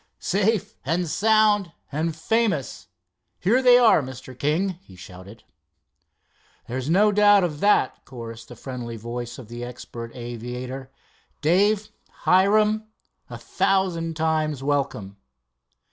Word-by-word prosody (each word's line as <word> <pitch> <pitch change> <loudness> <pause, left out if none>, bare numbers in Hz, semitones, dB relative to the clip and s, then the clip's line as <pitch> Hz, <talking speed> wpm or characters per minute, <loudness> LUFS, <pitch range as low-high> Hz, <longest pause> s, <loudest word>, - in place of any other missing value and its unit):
"Safe 205 +2 0
and 165 +5 -1
sound 210 -1 +2 0.2
and 155 +2 -2
famous. 170 - -1 0.5
Here 230 +8 +2
they 250 -1 +7
are, 235 -9 +5
Mr. 130 -1 -9
King!" 170 +7 -1
he 95 - -17
shouted. 95 +4 -12 1.2
"There's 130 +3 -4
no 205 +5 +4
doubt 205 -1 +5
of 155 -4 -2
that," 205 -9 +2
chorused 115 -2 -9
the 120 - -11
friendly 120 -2 -7
voice 120 +2 -6
of 130 -5 -10
the 120 +1 -7
expert 120 -1 -8
aviator. 125 +2 -6 0.5
"Dave! 205 +6 +2 0.3
Hiram! 210 +3 +3 0.4
A - - -7
thousand 170 -4 0
times 155 -3 0
welcome." 135 -9 -2
155 Hz, 115 wpm, -24 LUFS, 125-200 Hz, 1.2 s, they